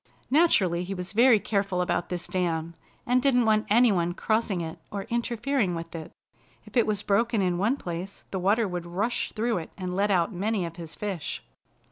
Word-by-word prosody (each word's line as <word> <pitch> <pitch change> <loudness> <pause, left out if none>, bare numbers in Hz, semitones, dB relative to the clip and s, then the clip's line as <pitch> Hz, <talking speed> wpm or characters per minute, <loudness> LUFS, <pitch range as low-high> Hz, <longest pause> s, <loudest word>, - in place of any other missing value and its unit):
Naturally 200 - +4
he 195 +2 -4
was 180 0 -5
very 235 +1 +6
careful 195 -3 -1
about 180 -1 0
this 175 -1 -4
dam, 170 -2 -1 0.3
and 250 +1 +3
didn't 250 -3 +3
want 215 -1 +2
any 235 +2 +5
one 175 -2 0
crossing 215 -4 0
it 160 -1 -6
or 200 -1 -4
interfering 235 -3 0
with 165 0 -6
it. 160 -2 -7 0.5
If - - -15
it 235 - +4
was 210 -1 0
broken 230 +3 +2
in 180 -2 +1
one 225 +8 +2
place 180 -1 -6
the 190 - -2
water 205 +4 +2
would 175 -2 -4
rush 205 +8 -1
through 225 -2 0
it 160 - -8
and 180 -2 -4
let 200 +2 +2
out 180 0 +2
many 200 +1 -1
of 165 0 -8
his 165 -2 -7
fish. 195 -7 -4
195 Hz, 195 wpm, -27 LUFS, 175-225 Hz, 0.5 s, very